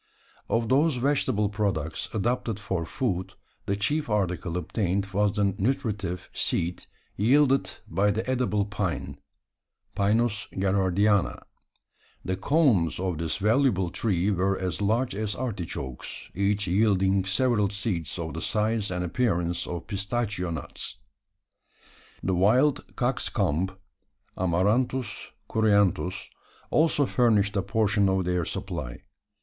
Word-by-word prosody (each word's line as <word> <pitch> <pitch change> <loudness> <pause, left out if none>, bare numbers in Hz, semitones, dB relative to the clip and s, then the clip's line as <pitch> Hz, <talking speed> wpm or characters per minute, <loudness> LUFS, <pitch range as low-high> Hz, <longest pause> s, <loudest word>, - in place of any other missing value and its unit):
Of 115 0 +1
those 145 +4 +3
vegetable 125 -5 +1
products 100 -7 -2
adapted 115 0 -1
for 95 -5 -3
food, 95 -7 -2 0.3
the 100 - +1
chief 145 +8 -1
article 90 -4 -1
obtained 95 +2 -1
was 100 0 +2
the 100 -2 +1
nutritive 105 -5 -1
seed 85 +2 -1 0.3
yielded 130 -1 +4 0.2
by 95 +5 +2
the 110 +4 -1
edible 125 -6 +1
pine 100 -3 -3 0.7
(Pinus 105 +1 +1
Gerardiana). 95 +1 +2 0.8
The 95 - 0
cones 105 - +2
of 90 -4 -2
this 80 +1 -2
valuable 105 -4 +2
tree 100 -2 0
were 95 0 +1
as 90 -2 -3
large 115 +5 +1
as 105 0 -2
artichokes; 90 - -5
each 100 +2 +1
yielding 95 0 +3
several 105 +1 +2
seeds 95 -7 -2
of 80 -2 -4
the 80 - -5
size 110 +1 0
and 90 0 -2
appearance 90 -4 0
of 85 -1 -5
pistachio 100 -2 -2
nuts. 80 - -4 1.3
The 95 - +1
wild 120 +11 +2
cockscomb 95 +6 0 0.6
(Amaranthus 105 +6 0 0.2
Cruentus) 100 -3 +2 0.4
also 155 -2 +3
furnished 110 -6 +2
a 100 - +2
portion 105 -1 +2
of 95 -1 +1
their 90 -1 0
supply. - - -5
100 Hz, 115 wpm, -27 LUFS, 90-115 Hz, 1.3 s, yielded